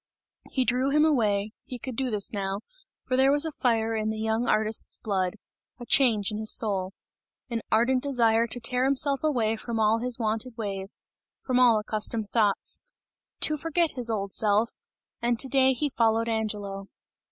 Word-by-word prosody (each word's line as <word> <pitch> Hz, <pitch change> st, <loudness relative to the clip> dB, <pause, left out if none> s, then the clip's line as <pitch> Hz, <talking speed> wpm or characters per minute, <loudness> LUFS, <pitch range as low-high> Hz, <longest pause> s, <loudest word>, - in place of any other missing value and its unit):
He 260 Hz, -2 st, 0 dB
drew 255 Hz, +3 st, +1 dB
him 300 Hz, +2 st, +3 dB
away, 215 Hz, -8 st, +1 dB
he 250 Hz, -, -8 dB
could 255 Hz, 0 st, -7 dB
do 260 Hz, +1 st, -1 dB
this 210 Hz, -2 st, 0 dB
now, 195 Hz, 0 st, -3 dB, 0.5 s
for 255 Hz, -, 0 dB
there 265 Hz, +1 st, +4 dB
was 290 Hz, +2 st, +4 dB
a 320 Hz, -, -3 dB
fire 225 Hz, -5 st, 0 dB
in 215 Hz, 0 st, -1 dB
the 220 Hz, -, -3 dB
young 220 Hz, +2 st, -1 dB
artist's 215 Hz, 0 st, +1 dB
blood, 190 Hz, -2 st, -2 dB, 0.4 s
a 240 Hz, -, -8 dB
change 230 Hz, -6 st, +2 dB
in 210 Hz, -, -4 dB
his 220 Hz, 0 st, +2 dB
soul; 195 Hz, -4 st, +1 dB, 0.6 s
an 230 Hz, -1 st, -2 dB
ardent 245 Hz, +4 st, +3 dB
desire 235 Hz, -4 st, +2 dB
to 245 Hz, -, -3 dB
tear 250 Hz, +2 st, +1 dB
himself 275 Hz, +1 st, +2 dB
away 235 Hz, -8 st, +1 dB
from 230 Hz, 0 st, -4 dB
all 220 Hz, +1 st, +3 dB
his 250 Hz, 0 st, -3 dB
wonted 225 Hz, +1 st, -2 dB
ways, 200 Hz, -2 st, -3 dB, 0.5 s
from 255 Hz, -1 st, +1 dB
all 240 Hz, -3 st, +6 dB
accustomed 215 Hz, 0 st, -2 dB
thoughts; 210 Hz, -3 st, +1 dB, 0.6 s
to 305 Hz, -, +2 dB
forget 330 Hz, +2 st, 0 dB
his 245 Hz, -3 st, -1 dB
old 200 Hz, -3 st, -3 dB
self 215 Hz, +1 st, +2 dB, 0.5 s
and 235 Hz, -1 st, 0 dB
to 270 Hz, -, +4 dB
day 265 Hz, -1 st, +3 dB
he 280 Hz, +3 st, -1 dB
followed 230 Hz, -3 st, +1 dB
Angelo. 205 Hz, -3 st, -3 dB
230 Hz, 175 wpm, -26 LUFS, 215-255 Hz, 0.6 s, all